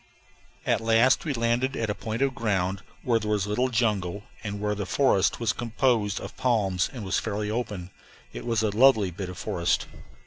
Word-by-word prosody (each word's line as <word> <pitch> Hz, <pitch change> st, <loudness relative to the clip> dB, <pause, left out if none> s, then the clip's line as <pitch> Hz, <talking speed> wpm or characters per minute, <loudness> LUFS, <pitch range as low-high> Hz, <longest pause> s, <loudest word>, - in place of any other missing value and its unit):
At -, -, +2 dB
last 115 Hz, +6 st, +4 dB
we 150 Hz, -, 0 dB
landed 120 Hz, +3 st, +1 dB
at 110 Hz, -2 st, -1 dB
a -, -, 0 dB
point 110 Hz, +4 st, -3 dB
of 135 Hz, -1 st, +1 dB
ground 100 Hz, -6 st, -1 dB, 0.2 s
where 115 Hz, -2 st, +2 dB
there 105 Hz, -1 st, -4 dB
was 105 Hz, -2 st, +1 dB
little 105 Hz, +5 st, 0 dB
jungle, 105 Hz, -5 st, 0 dB, 0.2 s
and 105 Hz, -2 st, -4 dB
where 105 Hz, 0 st, 0 dB
the 100 Hz, -1 st, -4 dB
forest 130 Hz, -9 st, +2 dB
was 115 Hz, -3 st, +1 dB
composed 115 Hz, -3 st, 0 dB
of -, -, -8 dB
palms 100 Hz, -8 st, +1 dB
and 120 Hz, -6 st, -7 dB
was 95 Hz, -2 st, +1 dB
fairly 105 Hz, +1 st, -3 dB
open. 105 Hz, -6 st, -4 dB, 0.4 s
It -, -, -6 dB
was 115 Hz, -2 st, 0 dB
a 105 Hz, -, +1 dB
lovely 110 Hz, -6 st, +5 dB
bit 90 Hz, +2 st, -6 dB
of 90 Hz, -, -8 dB
forest. 85 Hz, 0 st, 0 dB
110 Hz, 195 wpm, -26 LUFS, 100-120 Hz, 0.4 s, lovely